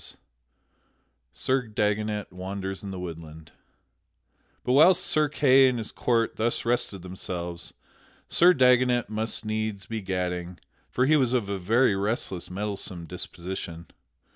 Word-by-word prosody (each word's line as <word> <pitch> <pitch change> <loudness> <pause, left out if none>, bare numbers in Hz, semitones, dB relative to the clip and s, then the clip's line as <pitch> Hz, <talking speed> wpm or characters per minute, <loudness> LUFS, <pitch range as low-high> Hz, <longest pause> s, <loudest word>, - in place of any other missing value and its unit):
[Sidenote: - - -9 1.1
Sir 130 - -1
Dagonet 105 -1 -1
wanders 95 +1 -5
in 100 - -7
the 95 - -6
woodland] 80 -3 -9 1.1
But - - -1
whilst 170 +6 +6
Sir 155 -1 +3
Kay 135 -3 +5
and 125 - -2
his 110 -2 -5
court 115 -2 0
thus 115 +1 0
rested 115 -6 -1
themselves, 90 -2 -6 0.5
Sir 180 +2 +6
Dagonet 125 -3 +3
must 110 +1 -2
needs 110 -2 -3
be 110 -1 -5
gadding, 90 -2 -3 0.3
for 125 - +1
he 155 +3 +4
was 130 -3 +2
of 115 -6 0
a 100 -1 -2
very 115 +4 +3
restless, 100 -3 -2
meddlesome 95 -2 -4
disposition. 85 -1 -5
105 Hz, 135 wpm, -26 LUFS, 90-125 Hz, 1.1 s, whilst